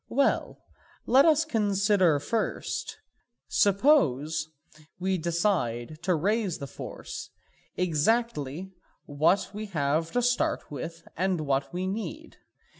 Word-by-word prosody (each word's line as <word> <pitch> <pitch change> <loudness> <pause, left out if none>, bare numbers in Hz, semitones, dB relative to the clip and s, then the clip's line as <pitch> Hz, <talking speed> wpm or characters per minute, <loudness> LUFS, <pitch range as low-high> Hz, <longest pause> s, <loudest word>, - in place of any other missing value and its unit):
Well, 275 +3 0 0.4
let 265 +3 +6
us 320 -1 +4
consider 200 - +2
first, 220 +10 -3 0.5
suppose 165 - +3 0.5
we 185 0 0
decide 160 - -1
to 180 -1 +1
raise 200 +2 0
the 140 - -6
force, 135 - -8 0.5
exactly 180 - 0 0.3
what 155 +7 +1
we 215 +1 -5
have 155 -2 0
to 245 - +1
start 245 -8 0
with 165 +4 -7
and 185 -1 0
what 140 -2 -1
we 180 +1 -3
need. 225 +11 -5
185 Hz, 110 wpm, -27 LUFS, 155-215 Hz, 0.5 s, let